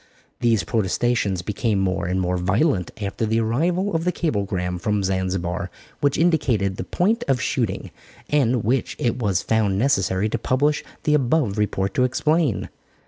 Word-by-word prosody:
These 115 -4 +2
protestations 105 -2 0
became 105 +2 -1
more 95 -3 0
and 95 +1 0
more 90 0 0
violent 95 - +1
after 100 +1 -3
the 110 +1 +1
arrival 170 - 0
of 165 - 0
the 180 - +1
cablegram 100 - -2
from 105 +2 0
Zanzibar 95 -1 -1 0.3
which 140 -1 +1
indicated 120 - +1
the - - -3
point 220 +7 0
of 135 -2 +2
shooting, 110 -3 -2 0.4
and 130 -5 +2
which 125 +3 0
it 120 - 0
was 100 -6 0
found 105 -4 +1
necessary 100 -5 +1
to - - -2
publish 145 +4 +1 0.2
the 150 - +2
above 135 -6 +2
report 95 -2 0
to 125 - +2
explain. 150 +1 +1
110 Hz, 155 wpm, -22 LUFS, 95-135 Hz, 0.4 s, These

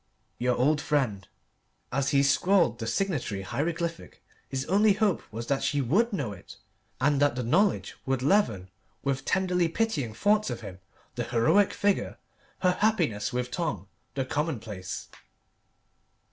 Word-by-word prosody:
"Your 125 0 +1
old 150 +4 +2
friend." 125 -11 -1 0.6
As 140 +1 0
he 140 0 +3
scrawled 140 - +3
the 110 - -4
signatory 135 - -1
hieroglyphic, 165 - -3 0.3
his 135 0 -3
only 205 +4 +4
hope 205 -3 +1
was 115 +2 -5
that 135 +2 0
she 145 - 0
would 195 - +2
know 140 - -2
it, 95 0 -12 0.4
and 140 +1 +2
that 145 -3 +3
the 125 - -2
knowledge 180 - +1
would 130 -1 0
leaven, 115 - +2 0.3
with 135 -1 -1
tenderly 180 -2 +1
pitying 165 - -1
thoughts 210 - +2
of 120 -1 -4
him, 95 -4 -9 0.3
the - - -3
heroic 155 - +3
figure, 205 -1 0 0.4
her 180 -1 +2
happiness 165 - +1
with 125 0 -2
Tom, 105 - -3 0.3
the 135 -1 -1
commonplace. 115 - -4
140 Hz, 145 wpm, -28 LUFS, 120-180 Hz, 0.6 s, only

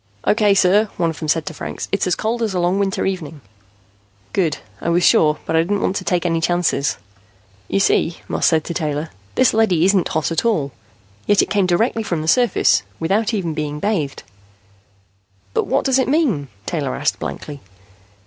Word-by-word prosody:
"Okay, 210 -2 +3
sir," 200 +3 +4
one 170 -2 +1
of 160 - -10
them 155 - -4
said 155 +1 +1
to 155 - -5
Franks. - - -6
"It's 200 - 0
as 180 - +1
cold 230 +2 -2
as 215 -4 -1
a - - +1
long 175 +3 +1
winter 195 -1 0
evening." 165 -6 -4 0.9
"Good. 165 -6 +1 0.2
I - - -1
was 175 +1 +2
sure, 150 -2 +4
but 160 - -1
I - - +5
didn't 200 +4 -1
want 190 - 0
to - - -4
take 180 -2 0
any 165 -1 +1
chances." 175 -4 0 0.7
"You - - 0
see," 170 -3 +2
Moss - - +1
said 160 -2 +3
to 170 - -5
Taylor, 155 -1 -3 0.2
"this 255 -1 +3
leady 190 -7 +3
isn't 195 -2 +3
hot 160 +1 -1
at 165 - 0
all. 165 -12 0 0.6
Yet 205 -1 +4
it - - -6
came 200 -3 +2
directly 225 +6 +1
from 170 -7 -2
the - - -5
surface, 240 - +3 0.2
without 205 +7 +1
even 185 -7 -2
being 150 -1 -4
bathed." 165 -8 -2 1.3
"But - - 0
what - - 0
does 265 0 +3
it 260 - +1
mean?" 265 - +1 0.2
Taylor 145 -6 -2
asked 145 +2 -1
blankly. 145 -2 -6
175 Hz, 195 wpm, -19 LUFS, 155-205 Hz, 1.3 s, I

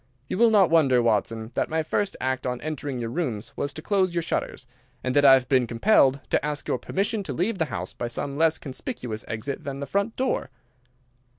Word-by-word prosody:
You - - -3
will 235 0 +6
not 200 -6 +4
wonder, 140 -7 +5
Watson, 115 0 0
that - - -1
my 160 0 0
first 200 +5 -1
act 130 0 -1
on 125 -1 -2
entering 145 -3 -4
your 115 -1 -4
rooms 120 -9 -3
was 140 - -2
to 155 - -8
close 185 -3 +1
your 170 - 0
shutters, 145 - -3 0.4
and 130 0 -1
that 145 - +5
I 135 -1 +9
have 130 -1 0
been 130 -3 +3
compelled 135 - +3
to - - +2
ask 150 0 -3
your 125 - 0
permission 205 - -1
to 160 -8 -5
leave 190 - -1
the 160 - +2
house - - -5
by 120 - -4
some 140 +4 -3
less 160 +1 +3
conspicuous 125 -4 -5
exit 120 +5 -4
than 140 -1 -5
the 140 - -3
front 200 - -1
door." 260 - -1
140 Hz, 215 wpm, -25 LUFS, 125-170 Hz, 0.4 s, I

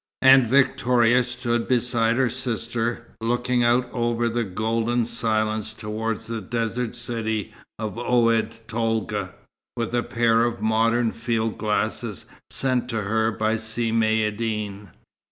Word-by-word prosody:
And 130 -2 +7
Victoria 125 -1 +3
stood 120 -1 -2
beside 120 -2 +2
her 130 0 +2
sister, 120 -1 -3
looking 120 +1 +1
out 120 +1 +3
over 120 -1 0
the 120 +1 -1
golden 115 +4 0
silence 110 -1 -1
towards 110 0 -3
the 115 -1 -4
desert 115 +3 -2
city 115 -3 -3 0.2
of 110 0 -4
Oued 115 -2 +1
Tolga, 110 -4 -2 0.4
with 115 0 -2
a 120 - +2
pair 115 -1 +2
of 120 0 -1
modern 115 +1 +2
field 115 -1 -2
glasses 110 0 -2 0.2
sent 125 -2 0
to 110 -3 -2
her 110 +2 +1
by 110 0 0
Si 110 +1 -1
Maïeddine. 110 -2 0
115 Hz, 125 wpm, -24 LUFS, 110-120 Hz, 0.4 s, And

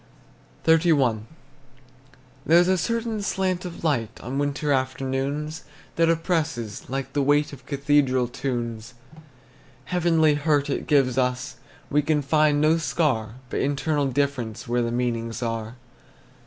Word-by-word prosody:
XXXI. 150 -10 +3 1.2
There's 175 +2 +6
a 190 - +3
certain 230 +3 -2
slant 185 -2 -1
of 175 -2 -8
light, 130 -9 -1
On 130 +4 -3
winter 145 +1 -1
afternoons, 135 +3 -2 0.3
That 165 0 +3
oppresses, 160 - -1
like 135 0 -4
the 145 - +1
weight 145 +2 +2
Of 135 -1 -12
cathedral 140 -3 +2
tunes. 120 -2 -4 0.9
Heavenly 165 -4 +3
hurt 145 -1 +1
it - - -3
gives 135 -4 +3
us; 125 0 -1 0.3
We 150 +1 +3
can 150 0 0
find 150 +1 +3
no 155 +2 +3
scar, 130 -10 0 0.2
But - - -1
internal 145 +1 0
difference 130 -5 -2
Where 120 +1 +1
the 115 0 -1
meanings 115 -1 -2
are. 115 0 -3
140 Hz, 130 wpm, -24 LUFS, 125-155 Hz, 1.2 s, There's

